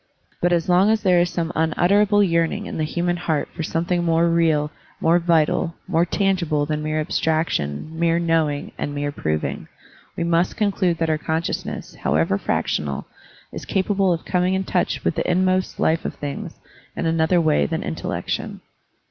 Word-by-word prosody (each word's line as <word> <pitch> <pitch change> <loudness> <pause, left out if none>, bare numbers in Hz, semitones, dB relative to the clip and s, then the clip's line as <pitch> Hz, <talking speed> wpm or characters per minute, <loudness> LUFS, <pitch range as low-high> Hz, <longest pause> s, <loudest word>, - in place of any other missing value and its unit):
But 175 - +2
as 170 -2 +1
long 185 +3 +4
as 220 0 +1
there 180 -3 +4
is 175 0 +2
some 170 -1 -2
unutterable 200 +6 +3
yearning 170 +3 +1
in - - -6
the - - +1
human 175 +2 -1
heart 160 -4 -1
for 170 - -5
something 170 +2 -1
more 165 0 +3
real, 160 -3 +2 0.3
more 170 +2 +3
vital, 165 0 +1
more 165 +2 +2
tangible 175 -7 +1
than 150 0 -2
mere 155 0 -1
abstraction, 155 - -1
mere 170 0 +2
knowing, 165 -4 0
and 145 - -3
mere 145 0 -2
proving, 75 - -3 0.5
we 170 - 0
must 170 +1 +1
conclude 190 -5 +1
that 165 -1 0
our 155 - 0
conscious 160 +1 -2
ness, - - -6
however 80 +6 0
fractional, 70 -7 -2 0.5
is - - -6
capable 195 -1 +1
of 165 -1 -2
coming 180 +1 +1
in 190 - 0
touch 185 -1 -1
with - - +1
the - - -2
inmost 185 +1 +1
life 160 +1 +2
of - - -4
things 145 -1 -6 0.4
in - - -3
another 165 +2 +2
way 115 - +2
than - - -3
intellection. - - -4
165 Hz, 175 wpm, -22 LUFS, 155-180 Hz, 0.5 s, long